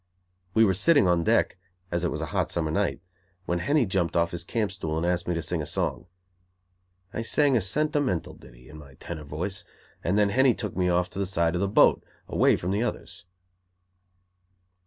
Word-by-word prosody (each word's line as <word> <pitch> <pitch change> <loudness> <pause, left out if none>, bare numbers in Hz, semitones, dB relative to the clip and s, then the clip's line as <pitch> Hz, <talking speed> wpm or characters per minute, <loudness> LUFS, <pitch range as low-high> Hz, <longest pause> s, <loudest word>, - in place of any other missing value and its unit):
We 110 0 +6
were 95 - +2
sitting 140 - +4
on 85 -1 +2
deck, 90 - +1 0.3
as 85 0 -1
it 90 - +1
was - - -4
a - - -2
hot - - 0
summer 80 -3 -1
night, - - -1 0.4
when 85 -1 -1
Henny 145 - +2
jumped 95 -4 -1
off 85 0 +2
his 85 -1 -4
camp 105 +3 -2
stool 80 -5 -3
and 80 - -1
asked 90 0 0
me 90 - 0
to 85 - -2
sing 85 0 -1
a - - -4
song. 85 - -2 1.1
I - - -3
sang 140 +4 +2
a 115 - +3
sentimental 145 - -1
ditty, - - -17
in 75 +3 -12
my 70 -2 -14
tenor 75 0 -8
voice, 90 +8 -4 0.4
and 90 +4 +1
then 105 -1 +3
Henny 130 +3 +3
took 105 -6 -5
me 90 -1 +1
to 90 0 +2
the 100 0 -2
side 85 -3 +1
of 90 - -1
the 100 - +1
boat, 100 - +4 0.2
away - - +3
from 90 - -3
the 100 +3 0
others. 120 - -4
90 Hz, 200 wpm, -26 LUFS, 85-105 Hz, 1.1 s, We